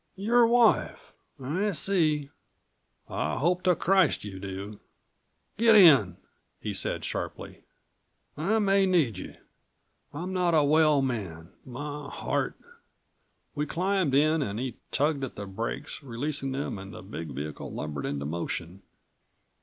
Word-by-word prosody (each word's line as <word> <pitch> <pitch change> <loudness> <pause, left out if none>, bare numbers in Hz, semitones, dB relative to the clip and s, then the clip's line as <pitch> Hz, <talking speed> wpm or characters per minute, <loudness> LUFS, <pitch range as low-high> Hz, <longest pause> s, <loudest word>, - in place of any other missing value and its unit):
"Your 230 +4 +4
wife. 235 0 +2 0.3
I 180 +11 -1
see...." 155 -6 +1 0.8
"I 80 +2 -2
hope 175 +7 +1
to 180 -1 +4
Christ 190 -2 +2
you 100 -2 -7
do 100 +2 -7 0.4
" - - -46
"Get 230 -1 +6
in!" 140 - +7 0.4
he - - -4
said - - -2
sharply. - - -5 0.7
"I 195 +9 +1
may 195 -2 +3
need 150 - +2
you. - - -8 0.8
I'm 175 +6 -5
not 180 -2 +2
a 155 - +5
well 150 -1 +4
man. 95 -10 -4
My 145 +3 -6
heart - - -2 0.5
" - - -46
We 150 +1 -2
climbed 185 -3 0
in 155 +2 +3
and 105 -5 -3
he 130 0 -4
tugged 145 0 0
at 130 - -5
the 100 - -6
brakes, 100 +10 -5
releasing 135 +2 -3
them 135 -6 -3
and 95 0 -9
the - - -10
big 85 -4 -7
vehicle 75 +1 -6
lumbered 75 -2 -4
into 70 0 -3
motion. 85 +3 -4
145 Hz, 140 wpm, -28 LUFS, -, 0.8 s, in